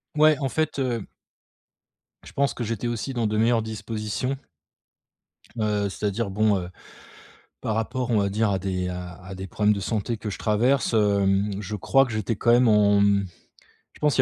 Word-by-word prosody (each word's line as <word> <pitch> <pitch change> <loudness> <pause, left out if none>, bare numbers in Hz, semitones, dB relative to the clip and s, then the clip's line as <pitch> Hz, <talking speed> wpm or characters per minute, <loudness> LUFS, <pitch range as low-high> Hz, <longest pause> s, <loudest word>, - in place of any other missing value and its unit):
Ouais, 155 -1 +5
en 135 - 0
fait, 155 +2 -1
heu 120 -5 -1 1.2
je - - -12
pense 140 -3 +1
que 120 - -4
j'étais 115 +1 -3
aussi 120 +3 -3
dans 115 -3 0
de 105 - -2
meilleures 115 +1 +3
dispositions 110 +4 -3 1.2
heu, 105 -2 0
c'est-à-dire, 105 +2 -2
bon, 105 +1 +2
heu, 90 - -6 0.9
par 110 - -2
rapport 125 +3 -2
on 110 - +3
va 100 0 +2
dire 110 +2 +1
à 95 - +1
des 90 -1 -2
à 90 0 -6
à 95 +1 -8
des 95 +1 -6
problèmes 105 +3 +2
de 100 - -4
santé 110 +2 -2
que 105 - -5
je 100 - -5
traverse, 120 +7 +2
hem, 100 -2 +2
je 105 +1 -4
crois 135 +7 +3
que 125 - -6
j'étais 110 +1 -2
quand 120 +3 +3
même 120 0 +5
en, 105 -1 +5
mmh, 100 -1 +3 0.7
je - - -18
pense 150 -1 +2
qu'il - - +3
110 Hz, 190 wpm, -25 LUFS, 100-120 Hz, 1.2 s, Ouais